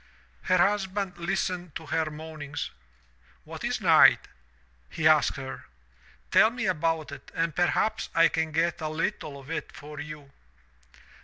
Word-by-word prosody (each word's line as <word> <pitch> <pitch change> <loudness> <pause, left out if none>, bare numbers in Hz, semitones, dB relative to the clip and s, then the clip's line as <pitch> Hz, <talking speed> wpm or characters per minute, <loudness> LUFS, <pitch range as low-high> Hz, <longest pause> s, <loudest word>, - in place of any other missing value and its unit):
"Her 185 - +3
husband 195 -1 0
listened 180 -2 -2
to 160 - -6
her 160 +1 -1
moanings. 150 -2 -6 0.7
'What - - -9
is - - -1
night?' - - +6 0.6
he 155 - +1
asked 155 -1 +4
her. 135 -1 -7 0.7
Tell - - +6
me 235 -1 -4
about 165 -4 0
it 140 -1 -10
and 165 -2 -1
perhaps 215 +5 +1
I 165 0 +6
can 160 0 -1
get 165 +2 0
a 155 - -2
little 155 -3 -3
of 135 +3 -11
it 165 - -4
for 150 +1 -10
you.' 150 -2 -8
160 Hz, 145 wpm, -27 LUFS, 150-180 Hz, 0.7 s, night